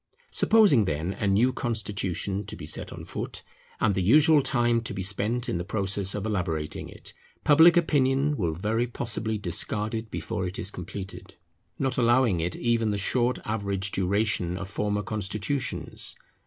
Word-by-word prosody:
Supposing 200 - +4
then 80 +3 -2
a 100 - -2
new 110 +7 +3
constitution 100 -4 -2
to - - -5
be - - -8
set - - -1
on - - -8
foot, - - -6 0.4
and 100 - +2
the 95 - 0
usual 150 - +5
time 120 -3 +2
to 115 - -5
be 95 - -3
spent 105 +6 0
in 85 - -1
the - - -2
process 100 -1 0
of 105 0 -3
elaborating 85 -8 -3
it, - - -8 0.3
public 160 +4 +7
opinion 145 -3 +2
will 85 - -1
very 110 +7 0
possibly 110 -2 -3
discard 105 +3 -1
it 110 0 -4
before 95 -3 -3
it 90 +5 -6
is 105 -4 -3
completed; 95 +1 -8 0.4
not 130 -1 0
allowing 120 -5 +3
it 85 +2 -2
even 115 -2 +1
the 105 - -1
short 120 +5 +1
average 100 -2 -1
duration 95 -2 0
of 100 0 -5
former 105 0 -1
constitutions. 110 +6 -2
105 Hz, 165 wpm, -26 LUFS, 95-120 Hz, 0.4 s, public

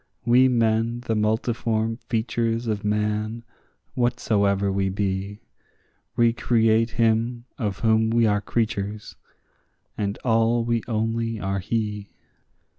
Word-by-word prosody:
We 125 +2 +5
men, 115 -1 +1
the 115 -2 -2
multiform 110 +1 0
features 115 0 -1
of 105 -2 -2
man, 105 +2 -1 0.5
whatsoever 100 -5 +1
we 95 0 0
be, 100 +1 -3 0.7
Recreate 115 -1 +3
him 115 +1 +1
of 105 -5 -3
whom 110 0 +3
we 115 0 +3
are 105 -1 +2
creatures, 105 -1 -3 0.8
and 100 -1 -2
all 115 0 +2
we 115 -1 0
only 115 0 -1
are 95 0 -2
he. 105 0 -3
110 Hz, 110 wpm, -24 LUFS, 105-115 Hz, 0.8 s, We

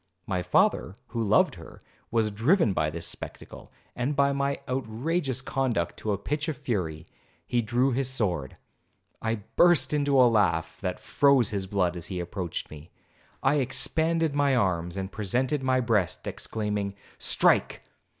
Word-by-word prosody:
My 90 -3 -1
father, 90 +2 +2
who 115 - -3
loved 105 -1 +3
her, - - -13 0.3
was 110 -2 +1
driven 115 - +2
by 75 -3 0
this 85 +2 -5
spectacle, - - -6 0.2
and 125 +4 -1
by 140 0 +3
my 140 0 -1
outrageous 130 +3 -2
conduct, 130 -11 -1
to 110 - -3
a 100 - 0
pitch 145 - -3
of 155 - -3
fury—he 85 - -4
drew 120 +4 +1
his 130 +1 0
sword. 90 - -2 0.6
I 110 -2 -2
burst 175 -3 +5
into 145 -2 +2
a 125 - +8
laugh, 100 -8 +1
that 90 -3 -3
froze 140 -6 +3
his 100 -2 -2
blood 95 -3 0
as 85 0 -5
he 95 -2 -4
approached 90 -1 -5
me. 75 +2 -11 0.5
I 140 +3 +3
expanded 160 +4 +1
my 140 -2 +2
arms, 90 -5 0
and 95 0 -4
presented 125 +8 -1
my 130 -1 +2
breast 110 -7 0
exclaiming, 105 -2 -3 0.2
'Strike! - - +2
115 Hz, 150 wpm, -27 LUFS, 95-135 Hz, 0.6 s, a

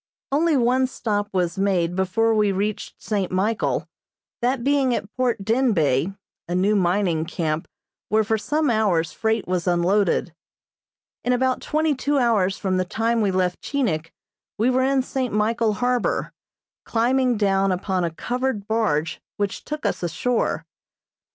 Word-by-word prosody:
Only 310 +1 +3
one 255 +1 +3
stop 205 -5 -2
was 180 -1 -1
made 180 -3 +1
before 210 +5 +1
we 210 -2 +3
reached 200 +2 -3
St. 200 -4 -2
Michael, 200 +4 0 0.5
that 245 0 0
being 270 -2 +2
at 205 - -6
Port 240 -5 0
Denbeigh, 195 - +1 0.3
a 175 - -2
new 195 +4 +2
mining 180 -3 +1
camp 160 -2 -2 0.4
where 220 0 +3
for 220 +2 +1
some 295 +5 0
hours 195 -8 +1
freight 220 -1 -1
was 180 -1 -1
unloaded. 180 0 +2 0.9
In 250 - +2
about 255 +1 +1
twenty 310 0 +1
two 285 +2 0
hours 215 -7 +2
from 185 -2 -1
the 185 - +2
time 225 +5 0
we 205 - +2
left 185 -1 0
Chinik 175 - -1 0.5
we 230 +4 +2
were 255 +1 +2
in 265 0 +2
St. 255 -1 -2
Michael 220 +1 +1
harbor, 245 +2 0 0.5
climbing 250 +1 +1
down 195 -1 +2
upon 185 0 -1
a 170 - +1
covered 245 +4 -3
barge 185 -9 0 0.2
which 205 -1 -2
took 300 0 -5
us - - -1
ashore. 225 +8 -1
215 Hz, 150 wpm, -23 LUFS, 185-250 Hz, 0.9 s, Only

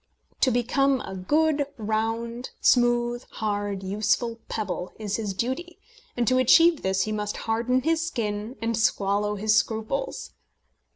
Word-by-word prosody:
To 260 - +4
become 260 +3 +2
a 190 - -7
good, 295 +8 +1
round, 225 +3 -2
smooth, 240 -1 +3
hard, 205 -2 -2
useful 215 +4 0
pebble 205 -4 -3
is 205 -2 -3
his 205 -4 -3
duty, 275 - -3 0.4
and 240 -1 +1
to 255 0 +4
achieve 330 +5 +5
this 190 0 +1
he 215 - -3
must 210 -1 -3
harden 240 +3 +1
his 325 +1 +1
skin 215 -4 -3
and 230 0 0
swallow 205 -1 +1
his 215 +1 +2
scruples. 220 - -1
225 Hz, 135 wpm, -25 LUFS, 210-255 Hz, 0.4 s, achieve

